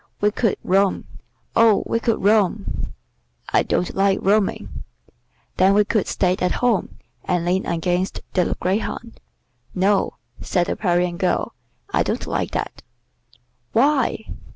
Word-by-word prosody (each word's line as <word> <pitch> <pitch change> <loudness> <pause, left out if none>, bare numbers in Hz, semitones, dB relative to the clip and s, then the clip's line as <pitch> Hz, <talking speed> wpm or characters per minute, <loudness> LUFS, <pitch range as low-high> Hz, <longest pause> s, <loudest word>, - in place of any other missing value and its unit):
We 210 0 +2
could 225 -1 0
roam; 195 +1 +2 0.5
oh, 225 -3 +5
we 230 - 0
could 230 -3 -1
roam!" 205 -1 +1 0.6
"I - - +5
don't 180 - -1
like 195 0 +2
roaming." 200 +1 0 0.7
"Then 190 +2 +4
we 210 0 +4
could 215 -2 0
stay 185 -1 +1
at 180 0 +1
home, 245 -5 0 0.3
and 175 -2 -1
lean 185 +2 0
against 175 +2 -1
the 180 -2 +1
greyhound." 220 +4 -3 0.6
"No," 195 +2 +2 0.3
said 175 -1 0
the - - -2
Parian 175 -2 0
girl, 185 - 0 0.4
"I - - +3
don't - - -1
like - - -2
that." - - -4 0.9
"Why?" 265 -2 +2
195 Hz, 130 wpm, -21 LUFS, 180-215 Hz, 0.9 s, oh